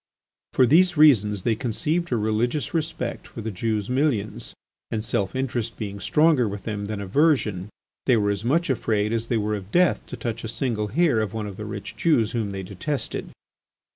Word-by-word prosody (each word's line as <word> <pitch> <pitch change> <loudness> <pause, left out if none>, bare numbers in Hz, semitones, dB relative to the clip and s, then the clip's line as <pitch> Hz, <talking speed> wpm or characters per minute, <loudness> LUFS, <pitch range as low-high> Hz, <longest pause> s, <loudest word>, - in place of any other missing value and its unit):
For 130 - +5
these 175 +6 +4
reasons 105 -10 +5
they 115 - +2
conceived 155 +9 -1
a 120 - +2
religious 110 +9 0
respect 160 -7 -3
for 115 - -8
the 110 +1 -3
Jews' 105 +1 -1
millions, 125 -6 -1 0.3
and 110 0 -2
self 100 -2 -1
interest 120 -3 -2
being 100 -2 -5
stronger 150 0 +3
with 100 0 -5
them 105 -2 -3
than 105 0 -4
aversion, 105 - +1 0.4
they 125 -3 +5
were 100 -1 +2
as 100 +1 -3
much 150 +6 +2
afraid 110 -3 0
as 115 0 -1
they 115 - +1
were 105 0 -1
of 100 -2 -5
death 180 +7 +3
to 125 - -7
touch 115 0 -4
a - - -3
single 115 -2 -1
hair 155 0 +2
of 110 0 -3
one 110 -1 -2
of 100 -2 -6
the 105 - -6
rich 100 -1 -6
Jews 120 -10 +2
whom 115 -4 -1
they 95 -1 -5
detested. 105 - -3
115 Hz, 195 wpm, -24 LUFS, 105-135 Hz, 0.4 s, For